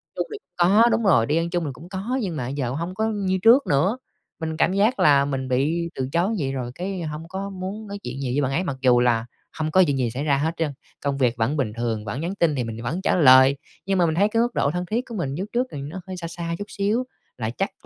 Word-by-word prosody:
chung - - -2
thì - - -4 0.2
có 195 +6 +5
đúng 230 - +1
rồi, 165 - +4
đi 150 +5 +1
ăn 170 +1 0
chung 175 -1 -1
thì 140 - -3
cũng 170 +6 -13
có, 205 +7 -3
nhưng 180 -6 -3
mà 125 -4 -3
giờ 135 -3 -2
hông 170 +6 -3
có 220 +2 0
như 190 -2 0
trước 245 +5 +6
nữa. 175 - +2 0.4
Mình 160 -1 -3
cảm 185 - +2
giác 215 +6 +2
là 140 -2 +5
mình 135 -2 -3
bị 155 +7 0
từ 130 0 -3
chối 185 +7 +1
vậy 135 -2 -1
rồi 125 -2 -4
cái 185 0 -4
hông 155 +1 -6
có 195 +2 -5
muốn 195 +3 -6
nói 200 0 -6
chuyện 125 +2 -5
nhiều 125 -2 -2
với 145 - +2
bạn 135 -1 0
ấy 170 +7 0
mặc 140 -6 -3
dù 125 -2 +5
là 120 -2 +2 0.3
hông 155 0 -1
có 185 +2 +6
chuyện 140 -1 0
gì 120 -3 0
xảy 135 +4 -4
ra 140 -3 +2
hết 160 +3 0
trơn, 160 -3 0 0.3
công 140 -1 -1
việc 125 -3 +2
vẫn 120 +7 0
bình 110 -6 -1
thường, 115 -2 -2
vẫn 135 +7 -4
nhắn 180 +4 -3
tin 165 -6 +2
thì 125 - -1
mình 115 -1 -5
thì - - -7
vẫn 155 +11 -3
trả - - +2
lời, 130 -3 +7 0.3
nhưng 195 -1 +1
mà 175 - +4
mình 160 -1 0
thấy 200 +4 +4
cái 230 +1 +2
mức 240 0 0
độ 140 - +2
thân 180 0 -3
thiết 235 +7 -2
của 230 - -6
mình 165 -8 -2
với - - -6
úc 200 +3 -4
trước 250 +2 +1
thì 140 - -6
nó 160 +7 -6
hơi 185 -1 -6
xa 170 -1 -5
xa 170 0 -4
chút 205 - -4
xíu. 210 +5 0 0.3
Là 110 -2 -2
chắc 195 - -4
165 Hz, 290 wpm, -23 LUFS, 135-190 Hz, 0.4 s, lời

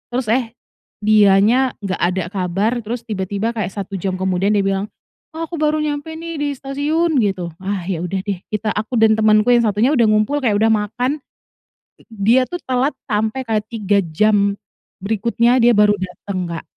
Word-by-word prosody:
terus, 250 -2 -1
eh, 235 -2 0 0.5
dianya 215 +4 +4
gak 190 -2 -2
ada 180 +1 +1
kabar 190 +3 -1
terus 235 +2 -5
tiba-tiba 205 +2 -2
kayak 200 -4 -2
1 195 0 -6
jam 185 0 -3
kemudian 190 +1 0
dia - - +3
bilang, 195 +2 -1 0.4
"ah 325 0 -4
aku 340 - -6
baru 305 0 +1
nyampe 300 +1 -3
nih 330 +1 -7
di 290 - 0
stasiun," 295 +5 -1
gitu. 190 -4 -1 0.2
Ah 195 -1 -2
ya 175 -3 -2
udah 190 +2 -2
deh, 195 -3 -3
kita 215 0 -3
aku 220 +3 -1
dan 220 -1 +5
temanku 215 0 +3
yang 240 - +4
1-nya 220 +5 +2
udah 235 - +4
ngumpul 215 +7 +1
kayak 210 -4 +2
udah 220 - +3
makan, 240 +7 -1 0.8
i - - -20
dia 230 +4 +2
tuh 355 +3 -6
telat 260 +3 0 0.2
sampai 220 +5 0
kayak 220 -3 -1
3 205 -3 +1 0.2
jam 200 +1 +3 0.5
berikutnya 235 +4 +1
dia 240 0 +5
baru 210 0 +5
datang, 185 0 -5
Kak,. 165 -1 -6
215 Hz, 180 wpm, -19 LUFS, 195-250 Hz, 0.8 s, dan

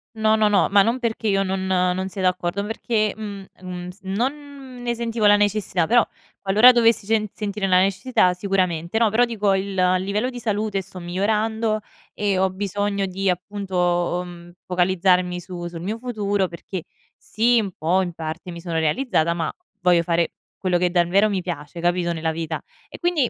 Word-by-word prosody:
No, 220 0 +3
no, 215 -1 +3
no, 200 -2 +3
ma 200 0 +6
non 230 +5 +1
perché 225 -2 -2
io 195 -1 +2
non 190 0 -2
non 185 0 +1
sia 190 0 -6
d'accordo, 180 +1 0
ma 205 - -5
perché 220 -2 0
mh, 205 -3 -7 0.2
mh, 185 - -10
mh, 180 0 -6
non 260 +5 -4
ne 240 -1 -1
sentivo 230 -2 -1
la 205 - +7
necessità, 205 -4 +1
però 235 +2 +4 0.3
qualora 215 +6 +7
dovessi 230 -3 +3
cen 215 0 +1
sentire 205 -2 -3
la 185 -1 +5
necessità, 195 +1 +2
sicuramente. 180 -1 -1
No, 225 -1 +4
però 240 +3 +4
dico 210 -4 0
il 190 +1 -1
il 185 0 +2
livello 210 +6 -1
di 245 - -7
salute 210 -3 -1
sto 185 -1 -7
migliorando 215 +5 0 0.4
e 200 -2 0
ho 190 0 +3
bisogno 200 +1 -2
di 190 +1 -1
appunto, 180 -2 -1
mhmm, 175 0 -11
focalizzarmi 180 0 +2
su 175 -1 -7
sul 170 -1 -8
mio 210 +5 -3
futuro 205 -5 -1
perché 175 +1 -7 0.3
sì, 235 +2 +2
un 200 -3 -2
po' 175 +5 +2
in 175 -2 -3
parte 160 +2 -6
mi 170 - -8
sono 165 -2 -2
realizzata, 170 - +1
ma 170 -1 -2 0.3
voglio 175 -1 +4
fare 170 0 +1 0.3
quello 185 -2 +1
che 180 - +2
davvero 180 +4 +3
mi 195 -2 -1
piace, 170 -1 -6
capito, 175 0 +1
nella 160 0 -1
vita. 160 0 -4 0.3
E - - -10
quindi 340 -8 +1
195 Hz, 185 wpm, -22 LUFS, 180-215 Hz, 0.4 s, la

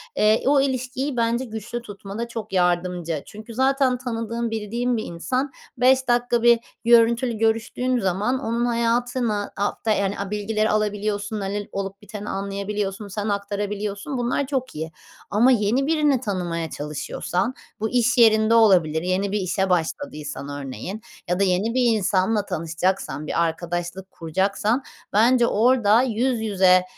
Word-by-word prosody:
eee, 215 +1 +3
o 280 0 +5
ilişkiyi, 260 0 -2
bence, 235 +2 +1
güçlü 225 +1 -6
tutmada 205 +1 -6
çok 225 -3 -7
yardımcı. 175 -3 0
Çünkü 220 +2 -10
zaten 265 +1 +2
tanıdığın, 230 -1 -3
bildiğin 230 +3 -1
bir 220 - -2
insan 255 - -2 0.3
5 260 +1 +4
dakika 240 -1 +2
bir 235 -1 +6 0.3
görüntülü 235 +1 +4
görüştüğün 225 +3 0
zaman 190 0 -1
onun 235 -2 -1
hayatına 235 -2 0
hafta 205 +2 -1
yani, 200 -1 0
a 200 0 -4
bilgileri 215 +1 0
alabiliyorsun, 210 0 -1
hani, 200 +1 -3
l - - -23
olup 195 +1 -5
biteni 210 0 -7
anlayabiliyorsun, 200 +1 -3
sen 205 +2 -3
aktarabiliyorsun. 205 +4 -3
Bunlar 245 +3 0
çok 260 - -3
iyi 160 +1 -4 0.4
ama 230 +6 +4
yeni 240 +4 +2
birini 300 -4 +3
tanımaya 175 -7 -2
çalışıyorsan 150 - -3 0.3
bu 220 +1 -1
iş 245 0 +2
yerinde 220 -1 +5
olabilir, 180 -9 +4
yeni 185 +3 0
bir 210 - 0
işe 190 +1 0
başladıysan, 160 - -2
örneğin, 145 - -6 0.3
ya 180 +1 +1
da - - +4
yeni 195 +4 +1
bir 255 - +2 0.2
insanla 200 +1 +1
tanışacaksan, 165 -2 -2
bir 170 - +1
arkadaşlık 175 +3 -4
kuracaksan, 200 - 0 0.3
bence, 235 +3 +4
orada 230 -1 +4
yüz 245 -1 0
yüze, 190 -4 +4
215 Hz, 140 wpm, -23 LUFS, 195-240 Hz, 0.4 s, bir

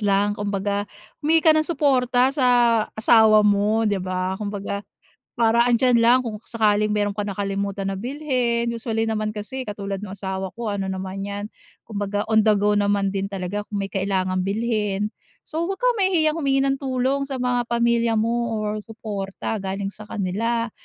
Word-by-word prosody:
lang. 205 0 +2
Kumbaga 205 0 -2 0.3
humingi 320 +2 +2
ka 320 - +8
ng 310 - +3
suporta 260 -4 +2
sa 275 -3 +1 0.5
asawa 220 -1 +6
mo 210 +2 +2
di 205 -2 0
ba? 185 0 -2
Kumbaga 200 -1 -4 0.5
para 235 0 +3
andiyan 245 0 +4
lang 235 +2 +5
kung 225 -4 -5
sakaling 210 -2 +1
meron 205 -1 +1
ka 205 - -1
nakalimutan 200 0 -2
na 195 - -3
bilhin 245 -2 -1
usually 225 -1 -2
naman 215 -1 -1
kasi 260 +5 -5
katulad 200 -1 -4
nung 190 - -8
asawa 190 -1 -4
ko 230 -2 -4
ano 200 -1 -2
naman 190 +1 -4
'yan. 205 0 -4 0.4
Kumbaga 205 -1 -3
on 220 0 +4
the 215 - +6
go 205 +1 +2
naman 200 -1 +1
din 195 0 -2
talaga 200 +1 -4
kung 205 -1 -3
may 195 - -5
kailangang 185 -1 -1
bilhin. 210 -1 -1 0.3
So, 325 +2 -3
'wag 390 +3 -4
kang - - +2
mahihiyang 330 -5 +2
humingi 275 -3 +2
ng 275 0 +1
tulong 265 +1 -1
sa 265 -2 -4
mga 245 -1 0
pamilya 235 -1 +2
mo 230 +1 0
or 215 0 -2
suporta 210 -1 -5
galing 195 0 -3
sa 210 +1 -11
kanila 225 +4 -1
215 Hz, 170 wpm, -23 LUFS, 200-240 Hz, 0.5 s, ka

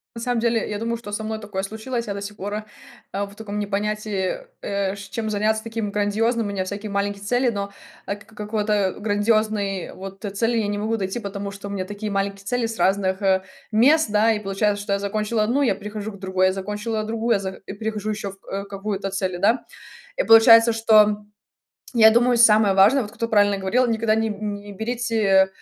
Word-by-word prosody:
На 230 - -6
самом 245 0 0
деле, 230 -1 +1
я 210 - -3
думаю, 230 +2 -2
что 225 -3 -9
со 210 +1 -3
мной 220 0 -3
такое 205 -3 -4
случилось. 225 +4 -4
Я 205 - -3
до 200 - -6
сих 205 +1 -7
пор, 205 +2 -5
э, 215 - -3 0.5
э, 200 - -1
в 200 0 -7
таком 210 -1 -6
не 210 - -1
понятии, 210 - -2 0.2
э, 200 -1 -1
ш 200 -1 -10
чем 220 +1 -3
заняться 220 +1 +1
таким 225 -2 -3
грандиозным. 215 +3 0
У - - -3
меня 190 -2 -2
всякие 205 +2 -5
маленькие 200 0 -2
цели, 245 +4 +2
но, 200 -3 -3 0.3
э, 200 - -2
к 200 - -16
к 220 - -20
какого-то 210 -2 0
грандиозной 205 -2 0
вот, 195 +1 -9
э, 205 - -2
цели 225 +4 0
я 210 - 0
не 205 0 -2
могу 220 +2 -1
найти. 195 +2 -3
Потому 200 -2 -5
что 200 0 -8
у - - -6
меня 190 -2 -3
такие 205 +2 -5
маленькие 195 0 -2
цели 245 +2 0
с 225 0 -6
разных, 190 0 +1
э, 190 -1 +3 0.3
мест, 255 +4 +4
да. 215 +2 +4
И 215 - -2
получается, 205 0 -1
что 200 - -1
я 200 - 0
закончила 215 +2 -1
одну, 255 +6 +1
я 255 - +3
перехожу 210 +1 -6
к 200 - -12
другой, 190 -1 +1
я 185 - +1
закончила 210 +3 -3
другую, 225 +2 0
я - - +2
за 195 -1 -3 0.2
и - - -6
перехожу 215 0 -3
еще 205 -2 -4
в 195 - -18
э, 200 +1 -3
какую-то 195 0 -4
цели, 190 -2 -2
да. 220 +7 +2 0.5
И - - +2
получается, 230 +1 +8
что, 225 -1 +6
м, 210 0 -3 0.6
я 220 -2 +7
думаю, 240 +1 +3
самое 215 -3 +6
важное,- 195 +8 +6
вот 210 -3 -6
кто 230 +1 -3
правильно 205 -2 +3
говорил,- 235 +7 +1
никогда 220 -1 +1
не 225 0 0
н 210 0 -4
не 205 0 -10
берите, 230 +3 -2
э, 195 -3 +5
210 Hz, 225 wpm, -23 LUFS, 200-225 Hz, 0.6 s, получается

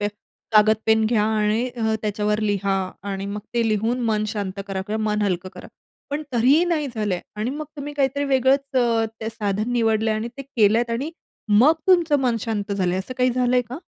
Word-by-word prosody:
पे 205 - 0 0.4
कागद-पेन 220 +1 +4
घ्या 215 -2 +2
आणि 215 +2 +1
अ, 220 -1 0
त्याच्यावर 210 0 0
लिहा 200 -2 0 0.3
आणि 195 0 -4
मग 205 +1 -4
ते 230 -1 +2
लिहून 225 +4 0
मन 215 0 +1
शांत 200 -2 -4
करा 195 -1 -3
किंवा 220 +1 -2
मन 210 0 0
हलकं 185 -2 -1
करा. - - -10 0.4
पण 295 +2 -2
तरीही 260 +8 +4
नाही 325 -4 0
झालं 210 -3 -1
आहे 175 - -6 0.2
आणि 225 +4 -1
मग 300 +3 -5
तुम्ही 290 +1 -6
काहीतरी 280 0 0
वेगळंच 275 0 +2 0.4
ते 220 - -3
साधन 215 0 -2
निवडलंय 220 -2 +2
आणि 220 +2 -3
ते 275 - -4
केलत 235 -3 +2
आणि 265 +7 -2 0.4
मग 225 +9 +6
तुमचं 340 -6 +4
मन 245 -3 +1
शांत 205 -2 -3
झालंय 185 -2 0
असं 195 +7 -6
काही 250 0 +3
झालंय 250 0 +2
का? 255 +4 -6
220 Hz, 190 wpm, -22 LUFS, 210-255 Hz, 0.4 s, मग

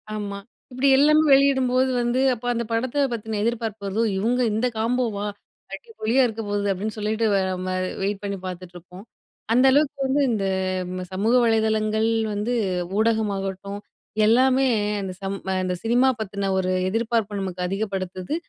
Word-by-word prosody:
ஆமா. 200 -1 -4 0.3
இப்புடி 255 +2 0
எல்லாமே 305 +2 +5
வெளியிடும்போது 265 -2 +3
வந்து, 240 +1 0
அப்ப 245 0 -8
அந்த 235 0 -2
படத்த 255 +5 0
பத்தின 220 -1 -4
எதிர்பார்ப்பு 220 -3 -2
வருதோ, 210 +4 0
"இவுங்க 235 +6 +1
இந்த 220 +4 0
காம்போவா 225 -2 -1 0.5
அடிபொலியா 270 - -1
இருக்க 225 -1 -5
போகுது" 205 0 0
அப்டின்னு 210 +4 -4
சொல்லிட்டு, 215 +2 -1
வேற 190 -1 +1 0.2
மாறி! 185 0 -1
வெயிட் 195 +1 -2
பண்ணி 200 -1 -3
பாத்துட்டுருப்போம். 180 +1 -9 0.5
அந்த 250 +3 +4
அளவுக்கு 285 0 +2
வந்து 270 +2 +1
இந்த 205 -4 -1 0.5
ம 185 0 -5
சமூக 215 +6 +1
வலைதளங்கள் 220 -1 +1 0.2
வந்து, 210 +4 -2 0.5
ஊடகமாகட்டும், 200 -3 -1 0.5
எல்லாமே 260 +4 +4 0.3
அந்த 190 -1 -5
சம் 195 0 -3 0.3
அந்த 185 0 -1
சினிமா 240 +3 +3
பத்தன 200 -2 -3
ஒரு 185 -1 0 0.2
எதிர்பார்ப்ப 225 -1 -1
நமக்கு 185 -1 -5
அதிகப்படுத்துது. 190 - -3
220 Hz, 140 wpm, -23 LUFS, 195-240 Hz, 0.5 s, எல்லாமே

